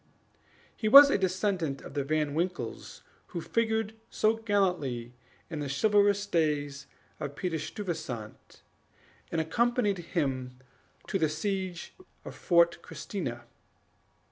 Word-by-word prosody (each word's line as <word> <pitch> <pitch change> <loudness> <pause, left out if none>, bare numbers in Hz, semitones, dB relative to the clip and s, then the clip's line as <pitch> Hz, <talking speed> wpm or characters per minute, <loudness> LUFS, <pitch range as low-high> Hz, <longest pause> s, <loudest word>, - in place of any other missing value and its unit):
He 215 - -2
was 280 +5 +10
a - - +3
descendant 185 -6 -1
of - - -10
the 145 -1 -1
Van 150 0 0
Winkles 175 +3 -4 0.2
who 175 - -5
figured 220 +3 0 0.2
so 215 +1 +2
gallantly 180 - 0 0.3
in 160 -3 -5
the 145 -2 -3
chivalrous 205 +6 +3
days 150 -6 -1 0.3
of 140 0 -5
Peter 170 -2 -2
Stuyvesant, 150 - -6 0.7
and 165 - 0
accompanied 210 +4 +1
him 135 -7 -2 0.5
to 195 - -1
the 160 -2 +2
siege 185 +2 -3 0.3
of - - -7
Fort 170 -2 +3
Christina. 125 - -5
175 Hz, 115 wpm, -29 LUFS, 145-205 Hz, 0.7 s, was